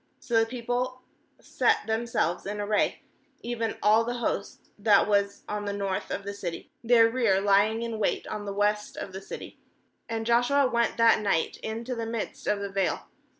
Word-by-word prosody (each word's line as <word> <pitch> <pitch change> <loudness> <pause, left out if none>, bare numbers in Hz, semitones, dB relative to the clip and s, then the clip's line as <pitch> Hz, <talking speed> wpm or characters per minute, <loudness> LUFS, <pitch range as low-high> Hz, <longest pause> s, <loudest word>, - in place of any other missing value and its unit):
uSo 235 -2 +1
the 225 - +2
people 250 +1 -3 0.4
set - - +1
themselves 220 -6 -1
in 210 +1 -4
array, 205 0 0 0.4
even 230 -2 -2
all 215 +2 +5
the 240 +1 -3
host 235 -4 -4
that 205 -1 +4
was 200 -1 +1
on 210 0 -3
the 200 - -2
north 195 -2 -2
of 200 - -3
the 200 +1 -5
city, 180 -4 -6
their 230 -1 +6
rear 225 -5 +2
lying 205 +3 +3
in 230 -2 -4
wait 205 - 0
on 210 -1 -5
the 200 - -3
west 210 +1 0
of 190 - -6
the 190 - -6
city; - - -9 0.5
and 225 0 -2
Joshua 245 +4 +3
went 235 -1 0
that 230 -1 +5
night 195 -6 0
into 230 +3 -4
the 230 -2 -3
midst 230 -1 -5
of 210 -1 +1
the 200 -1 -4
vale. 195 -1 -1
220 Hz, 185 wpm, -27 LUFS, 200-235 Hz, 0.5 s, their